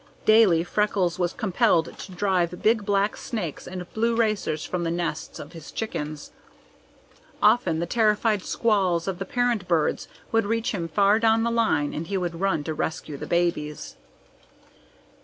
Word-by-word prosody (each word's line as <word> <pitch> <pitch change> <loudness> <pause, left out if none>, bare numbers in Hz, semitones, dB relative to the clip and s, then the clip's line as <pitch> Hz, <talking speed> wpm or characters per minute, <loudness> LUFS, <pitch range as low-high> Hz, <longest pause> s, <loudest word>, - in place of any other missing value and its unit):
Daily 215 -7 +5
Freckles 185 -2 0
was 175 -1 +1
compelled 190 -5 +1
to 190 - -8
drive 180 -2 0
big 220 -1 +3
black 200 +1 +1
snakes 210 - -5
and 180 -1 -6
blue 230 +1 +1
racers 215 -9 0
from 180 -1 -3
the 165 - -1
nests 170 -2 -3
of 145 +4 -10
his 165 -2 -10
chickens. 155 -9 -5 1.1
Often 180 -10 +3
the 170 - -1
terrified 215 +1 +2
squalls 190 -6 +1
of 190 -2 -3
the - - -3
parent 245 -7 0
birds 165 -3 +1 0.2
would 225 -2 +2
reach 230 +1 0
him 175 -6 -3
far 200 +5 +3
down 225 0 +3
the 235 - 0
line 215 -11 +1
and 160 +2 -4
he 195 - -1
would 175 -2 -3
run 190 -6 +1
to 160 - -3
rescue 155 -1 -4
the - - -7
babies. 170 -4 -1
185 Hz, 160 wpm, -25 LUFS, 170-220 Hz, 1.1 s, Daily